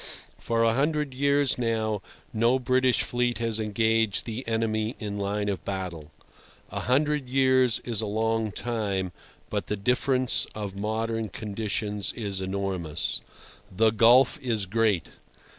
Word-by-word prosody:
For 115 0 +1
a 115 0 +4
hundred 150 +1 0
years 140 0 +2
now 110 -3 0 0.3
no 115 +3 +3
British 130 -1 +2
fleet 120 +1 0
has 115 -1 -1
engaged 110 -1 +1
the 115 +2 -4
enemy 110 0 0
in 105 -2 -4
line 100 +1 -1
of 100 -2 -2
battle. 90 -6 -5 0.6
A - - -3
hundred 145 +1 +1
years 130 -2 +3
is 115 -3 -1
a 110 - -2
long 110 +1 0
time, 100 -6 -2 0.4
but - - -2
the 105 - -1
difference 125 +4 +1
of 100 -3 -5
modern 110 +2 -2
conditions 105 0 -3
is 100 -4 -4
enormous. 95 -5 -2 0.5
The 110 +4 +3
gulf 120 +7 +5
is 115 -6 -1
great. 105 -2 +1
115 Hz, 135 wpm, -27 LUFS, 105-125 Hz, 0.6 s, gulf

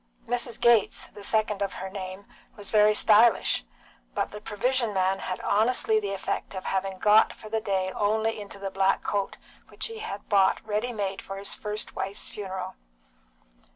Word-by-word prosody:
Mrs. 240 0 -2
Gates, 235 -4 +4
the 205 0 -11
second 210 -1 +1
of 200 - -1
her 190 - -5
name, 190 0 -7 0.3
was 205 -3 -5
very 210 0 +5
stylish, 220 +2 +5 0.5
but - - -1
the 210 - -8
provision 230 +1 0
man 190 +1 +2
had 185 - -4
honestly 220 0 +3
the 200 -2 -3
effect 195 - -3
of 185 - -6
having 190 0 -1
got 210 +3 +5
for 215 - -12
the 220 0 -1
day 190 -2 0
only 220 +2 0
into 200 -1 -9
the 195 -1 -5
black 195 0 +2
coat 200 -1 -2 0.3
which - - -3
he 450 -1 -5
had 200 - -6
bought 195 -2 +4
ready 215 +3 -1
made 200 -4 -3
for 195 - -7
his 195 0 -2
first 210 0 -4
wife's 195 +2 -3
funeral. 190 -2 -5
205 Hz, 175 wpm, -27 LUFS, 195-220 Hz, 0.5 s, very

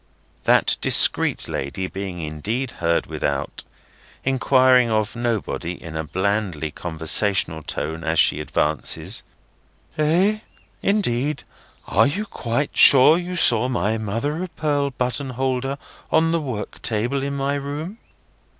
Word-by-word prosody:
That - - +3
discreet - - +4
lady 80 +8 -4
being 95 -1 -6
indeed 105 - -4
heard 85 0 +1
without, 70 0 -4 0.6
inquiring 130 -2 +3
of 110 +1 -1
nobody 115 -7 -3
in 85 -2 -10
a 80 - -2
blandly 95 -3 -2
conversational 80 +1 +2
tone 80 +2 -4
as 80 0 -1
she - - +4
advances: 75 +1 -1 0.8
"Eh? 180 +8 +2 0.4
Indeed! 150 - 0 0.4
Are - - +3
you 200 +10 -3
quite 135 - -3
sure 135 +3 +8
you 180 +1 -4
saw 125 -7 +4
my 110 -3 -1
mother 115 - -3
of 185 -2 -7
pearl 145 -2 0
button 125 +1 -3
holder 130 +1 -2 0.3
on 165 +1 +3
the 165 -1 0
work 125 -8 -6
table 120 +5 -1
in 140 +1 -3
my 140 0 -1
room?" 145 +9 -5
120 Hz, 125 wpm, -21 LUFS, 95-140 Hz, 0.8 s, sure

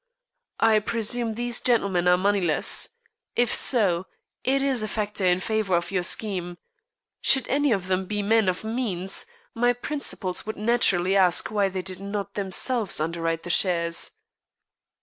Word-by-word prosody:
I 220 -1 +5
presume 230 +1 -2
these 240 +1 -1
gentlemen 200 -7 +1
are 180 0 +5
moneyless. 190 -4 +1 0.5
If 240 -1 +2
so, 190 -8 +2 0.4
it 270 +1 +1
is 265 -4 0
a 215 - -2
factor 210 -3 -2
in 180 0 +3
favor 215 -2 0
of 175 - -4
your 185 -2 0
scheme. 175 -2 -1 0.6
Should 265 - +3
any 285 0 +1
of 195 -4 0
them 185 0 -1
be 205 0 -2
men 220 -1 +3
of 180 +2 -3
means, 220 - -2 0.3
my 245 +1 +2
principals 245 -8 -2
would 220 - -6
naturally 200 -5 +2
ask 185 +1 +3
why 205 -2 +1
they 185 -1 -4
did 185 0 -5
not 200 0 -5
themselves 205 +2 -1
underwrite 165 +1 -2
the 175 - -3
shares." 170 - +1
200 Hz, 150 wpm, -25 LUFS, 180-225 Hz, 0.6 s, I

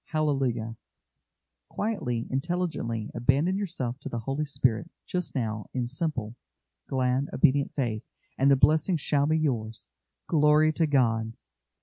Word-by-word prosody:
Hallelujah!" 135 -7 -1 0.9
Quietly, 125 - -2
intelligently, 135 -7 -2
abandon 135 +9 +2
yourself 150 -11 -3
to - - -6
the 120 - -4
Holy 135 +6 -2
Spirit 135 0 0 0.2
just 180 -2 -3
now 110 -4 -2
in 125 -2 0
simple, 130 -4 -3 0.5
glad, 130 +1 +1
obedient 140 +2 +2
faith, 115 -6 -1 0.3
and 135 +1 +3
the 140 - +7
blessing 155 +6 +3
shall 145 -1 +1
be 155 +1 +2
yours. 115 -8 -2 0.4
Glory 155 0 +4
to 160 0 +1
God! 115 -5 +2
135 Hz, 125 wpm, -27 LUFS, 120-155 Hz, 0.9 s, the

